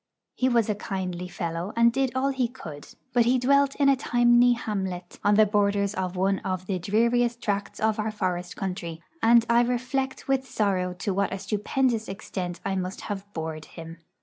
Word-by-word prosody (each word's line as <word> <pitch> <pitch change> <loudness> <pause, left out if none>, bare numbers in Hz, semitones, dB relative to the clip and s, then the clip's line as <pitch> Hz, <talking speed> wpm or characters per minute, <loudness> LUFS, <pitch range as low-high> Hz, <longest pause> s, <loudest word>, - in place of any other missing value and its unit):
He 255 - +1
was 235 -3 +3
a 215 - +1
kindly 185 -3 -4
fellow, 175 +1 -4
and 235 0 +4
did 265 -1 +1
all 265 +1 +1
he 265 -3 0
could; 160 - -10 0.3
but 240 -2 +4
he 250 +2 +4
dwelt 280 +2 +3
in 280 - +2
a 275 - +6
tiny 240 -1 +4
hamlet 190 -6 -4
on 205 0 +4
the 215 +1 +6
borders 200 -1 +1
of 185 -1 -3
one 190 +1 +1
of 185 -1 -3
the 185 -1 -2
dreariest 235 +5 +1
tracts 205 -3 -2
of 220 0 +1
our 215 +1 0
forest 180 -4 -3
country, 170 -3 -5 0.2
and 230 0 +6
I 235 0 +5
reflect 255 +3 -2
with 270 -1 +1
sorrow 185 -4 0
to 190 +2 -2
what 200 +1 0
a 195 - -2
stupendous 225 +3 -1
extent 185 -3 -5
I 195 -1 0
must 185 +1 -4
have 205 -1 -6
bored 160 -1 -5
him. 165 0 -10
205 Hz, 190 wpm, -26 LUFS, 185-240 Hz, 0.3 s, a